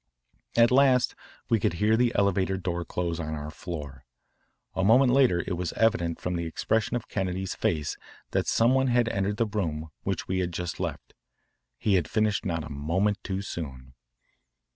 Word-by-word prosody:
At 115 +1 +5
last 130 -1 +4 0.3
we 115 -2 +3
could 90 - +1
hear 105 +6 +2
the 120 +1 +3
elevator 95 -1 +2
door 90 -1 -2
close 85 -1 -3
on 80 -1 -3
our 75 0 -6
floor. 75 -6 -7 0.7
A 95 - -1
moment 125 +5 +5
later 125 -11 +4
it 90 - -2
was 90 -1 -3
evident 105 -7 +1
from 90 0 -2
the 85 0 -2
expression 110 +8 0
of 115 -2 -3
Kennedy's 95 -1 -2
face 75 -3 -1 0.3
that - - 0
some 115 +3 +4
one 135 0 +3
had 120 -2 +3
entered 100 0 -1
the 115 - +2
room 80 -7 -3
which - - -3
we 95 0 0
had 90 -1 -1
just 85 0 -4
left. - - -4 0.6
He 105 - +1
had 90 -5 +2
finished 110 -2 +1
not 80 -2 -1
a 75 - -8
moment 85 +9 0
too 95 0 -3
soon. 65 -9 -7
95 Hz, 180 wpm, -27 LUFS, 85-110 Hz, 0.7 s, At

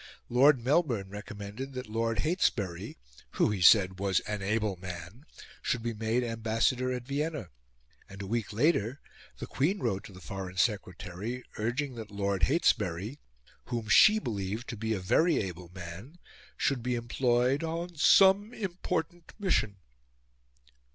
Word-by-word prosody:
Lord 135 +3 +5
Melbourne 130 - +1
recommended 105 +5 -7
that 125 -2 -6
Lord 115 +1 -1
Heytesbury, 100 - -1 0.4
who, - - +2
he 100 -3 -3
said, 95 0 +6
was 95 -2 +2
an 105 -1 -4
able 105 0 0
man, 90 - -9 0.3
should 120 -2 -1
be 120 0 -2
made 115 +3 0
Ambassador 115 +2 0
at 125 -1 -4
Vienna; 145 - -3 0.6
and 100 - -11
a 100 - -5
week 110 +1 -2
later 125 +1 +1 0.4
the - - -5
Queen 170 +9 0
wrote 110 - -2
to - - -11
the 90 - -12
Foreign 95 +2 -7
Secretary 105 +2 -2 0.2
urging 125 +5 -1
that 110 -3 -8
Lord 100 -3 0
Heytesbury, 110 - +1 0.5
whom 115 -3 -4
she 215 - +7
believed 110 - -3
to - - -4
be 110 +1 -2
a - - -3
very 160 - +3
able 90 -3 -4
man, 90 - -9 0.4
should 135 -4 0
be 125 +1 -1
employed 120 +3 +1
"on 170 +2 -4
some 195 +8 +5
important 175 -3 -4
mission." 115 - 0
115 Hz, 145 wpm, -30 LUFS, 100-135 Hz, 0.6 s, she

